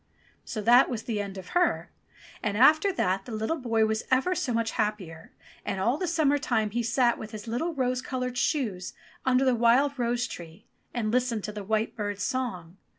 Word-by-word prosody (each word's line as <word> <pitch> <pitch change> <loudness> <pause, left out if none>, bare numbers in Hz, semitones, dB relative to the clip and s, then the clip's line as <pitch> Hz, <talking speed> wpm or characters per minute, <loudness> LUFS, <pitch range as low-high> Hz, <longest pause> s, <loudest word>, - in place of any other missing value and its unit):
So 215 - -5
that 240 +5 +6
was 225 -3 -5
an 220 -3 -1
end 200 -1 -5
of 185 -2 -9
her. 355 0 +1 0.5
And 210 -1 -1
after 310 - +5
that 195 - 0
the - - -8
little 220 +9 -2
boy 230 -3 +2
was 220 0 0
ever 265 +8 +2
so 300 -7 -2
much 230 -1 0
happier, 200 -7 -3 0.3
and 195 - -3
all 235 +7 +2
the 365 - -1
summer 305 -4 +2
time 220 -6 0
he 240 +3 0
sate 235 +1 +2
with 215 - -7
his 215 0 -9
little 310 +9 -2
rose 255 -2 0
coloured 255 -2 -3
shoes 235 - -1 0.3
under 260 +1 +4
the 260 - +4
wild 250 +4 +3
rose 240 0 0
tree 170 -3 -10 0.3
and 220 -3 -2
listened 245 -3 0
to 210 - -4
the 210 -1 -6
white 220 +2 -1
bird's 205 -2 -3
song. 190 -10 -3
235 Hz, 200 wpm, -27 LUFS, 210-255 Hz, 0.5 s, that